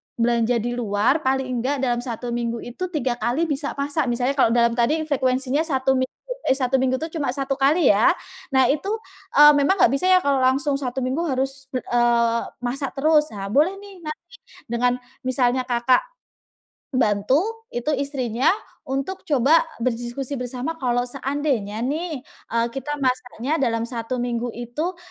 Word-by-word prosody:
belanja 235 0 +2
di 240 - -1
luar 235 +3 +1
paling 265 -3 -1
nggak 270 +3 -1
dalam 240 -2 +1
1 240 -1 -5
minggu 235 -1 -2
itu, 255 +10 -5
3 260 -8 -2
kali 250 +8 0
bisa 290 -3 -2
masak. 285 +1 -1
Misalnya 245 +2 +1
kalau 230 - +5
dalam 235 -1 +4
tadi 305 +7 +2
frekuensinya 265 -2 0
1 270 -5 +1
minggu 260 - +1 0.4
eh, - - +4
1 265 -1 +1
minggu 260 +1 0
itu 325 +1 -4
cuma 280 -5 -1
1 275 -1 -2
kali 285 +3 +4
ya. 215 - +5 0.4
Nah 265 -1 +4
itu, 300 +7 0 0.4
eee, 295 +1 +9
memang 285 +7 +3
nggak - - +7
bisa 275 +6 0
ya 370 0 +5
kalau 280 -3 +2
langsung 275 +2 +2
1 265 -1 -3
minggu 260 +7 -1
harus 270 -1 -2
bel 255 - -1
eee, 235 -1 +2 0.2
masak 265 +3 -3
terus. 300 +1 +4
Ah, 195 -1 -5
boleh 295 - +3
nih 400 -1 -12
nanti 305 0 -5 0.5
dengan 245 +1 +2 0.3
misalnya 255 0 +1
Kakak, 245 +1 +3 0.9
bantu 270 - +1
itu 240 +5 -2
istrinya 265 -2 -1 0.4
untuk 275 +8 -3
coba 290 +2 +4 0.2
berdiskusi 245 +3 -2
bersama, 250 +5 -4
"Kalau 245 -2 +1
seandainya 265 -5 -2
nih," 300 +1 -3
eee, 230 -4 -3
"kita 270 +3 -4
masaknya 255 +2 -1
dalam 230 -4 +1
1 235 +1 -4
minggu 240 0 -2
itu," 245 +10 -3
260 Hz, 165 wpm, -23 LUFS, 240-285 Hz, 0.9 s, eee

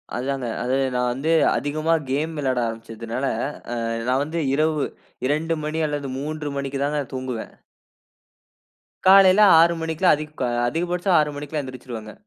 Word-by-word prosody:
அதுதாங்க, 130 0 -2 0.2
அது 130 +2 0 0.2
நான் 125 0 +1
வந்து 150 +6 -1 0.3
அதிகமா 155 +3 0 0.2
கேம் 155 +4 -1
விளாட 130 -3 0
ஆரம்பிச்சதுனால, 115 +2 -5 0.5
அ - - -2 0.3
நான் 130 +2 +2
வந்து 165 +3 -3
இரவு 155 0 +1 0.4
2 160 +3 0
மணி 155 +1 -2
அல்லது 145 -2 -3
3 150 +1 -4
மணிக்கு 135 0 -3
தான் 145 +1 -1
நான் 140 -3 -4
தூங்குவேன். 130 -3 -5 1.5
காலைல 195 +1 +7 0.2
6 170 +1 +5
மணிக்குலாம், 160 +1 +3
அதிக 155 0 -7 0.4
அதிகபட்சம் 175 +5 0
6 150 -1 +1
மணிக்குல்லாம் 145 0 -4
எந்திரிச்சுருவேங்க. 120 -4 -8
145 Hz, 135 wpm, -23 LUFS, 130-160 Hz, 1.5 s, காலைல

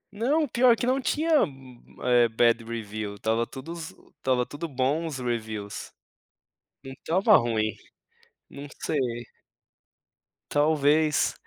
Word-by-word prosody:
Não, 290 +8 +1
pior 240 -1 +4
que - - -2
não 260 +2 +1
tinha 310 +3 +2
u - - +2 0.5
u - - -11
eh, 120 -1 +5
bad 115 +1 +2
review. 110 -2 -5
Estava 115 +3 0
tudo 145 +5 -8
zo 165 -2 -10
estava 130 -4 +1
tudo 155 +6 -6
bom 140 +4 0
os 150 -4 -5
reviews, 110 -4 -4 0.9
não 135 - -8
estava 190 - +4
ruim, 110 -3 0 0.7
não 140 +1 -9
sei. 150 - -1 1.5
Talvez, 150 0 +3
140 Hz, 125 wpm, -26 LUFS, 115-170 Hz, 1.5 s, eh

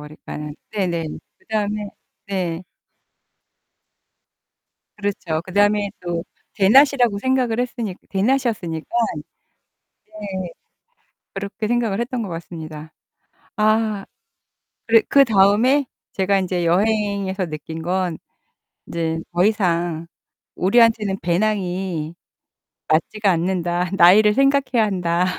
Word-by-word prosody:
그러니까는 150 0 -8 0.2
네네. 175 -6 -1 0.3
그다음에 210 -1 -2 0.4
네. 180 -3 -2 2.3
그렇죠. 185 -6 -2
그다음에 205 +1 +2
또 175 -1 -3 0.3
대낮이라고 245 +1 +4
생각을 250 -1 +1
했으니까 235 -6 -4
대낮이었으니까. 200 -7 0 1.2
네. 195 -4 -6 0.8
그렇게 200 +2 -4
생각을 230 -3 0
했던 240 0 -2
것 200 - -4
같습니다. 160 -2 -8 0.6
아. 215 -2 +1 0.8
그리 225 -1 +5
그다음에 240 +2 +4 0.3
제가 195 +1 +2
인제 180 -2 -1
여행에서 200 +1 +1
느낀 160 +1 -7
건 180 -1 -1 0.7
'인제 165 -1 -2 0.2
더 175 +1 +2
이상 175 -6 0 0.5
우리한테는 215 0 +3
배낭이 180 -3 -1 0.7
맞지가 195 +5 +1
않는다. 175 0 0
나이를 210 +5 +7
생각해야 270 -3 +3
한다.' 180 -3 0
195 Hz, 235 characters per minute, -21 LUFS, 175-215 Hz, 2.3 s, 나이를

